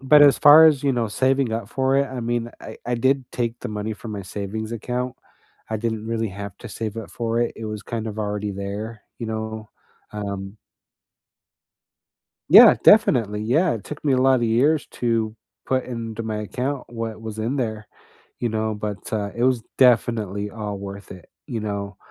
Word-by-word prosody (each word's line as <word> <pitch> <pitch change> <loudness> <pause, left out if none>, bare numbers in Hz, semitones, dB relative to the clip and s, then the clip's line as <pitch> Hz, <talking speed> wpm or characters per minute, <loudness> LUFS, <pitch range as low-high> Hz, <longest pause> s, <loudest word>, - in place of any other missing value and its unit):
but 145 +2 +6
as 140 -1 +6
far 155 +2 +9
as, 145 -3 +3
you 135 - +3
know, 115 -3 0
saving 130 +1 +1
up 115 -2 -3
for 130 +2 +1
it, 140 0 +2
I 130 - -6
mean, 120 0 -2
I - - -9
I 120 - 0
did 130 +1 +1
take 120 -1 -2
the - - -5
money 105 +1 -3
from 110 0 -8
my 100 -1 -5
savings 105 +4 -5
account. 125 +2 -3 0.6
I 110 - 0
didn't 110 0 -3
really 115 -1 -1
have 100 0 -7
to - - -9
save 110 -1 -5
up 115 - -6
for 115 0 -1
it. 120 - 0
It 115 - -7
was 105 -2 -5
kind 115 0 -4
of 110 - -7
already 105 -1 -2
there, 105 +3 -6 0.2
you 115 - -4
know, 110 -1 -5 0.4
um 100 -1 -5 1.9
Yeah, - - +10
definitely, 105 -3 +5
yeah, 155 +10 +2
it 110 - -7
took 150 - -8
me 140 -3 +2
a - - +2
lotta 130 -2 +3
years 140 +7 +2
to 115 -2 -1 0.3
put 130 -1 0
into 115 -2 -5
my 110 -1 -3
account 125 +5 -3
what 115 -2 -5
was 110 -1 -7
in 120 +6 -1
there, 110 -4 -3 0.5
you 120 - 0
know, 110 0 -1
but, 105 -1 -4 0.2
uh, 105 -2 -1
it 120 - -1
was 130 -3 +2
definitely 110 -5 +2
all 105 -2 -5
worth 100 0 -8
it, 90 -3 -13 0.2
you 120 -6 -4
know. 100 -2 -4
115 Hz, 190 wpm, -23 LUFS, 105-125 Hz, 1.9 s, Yeah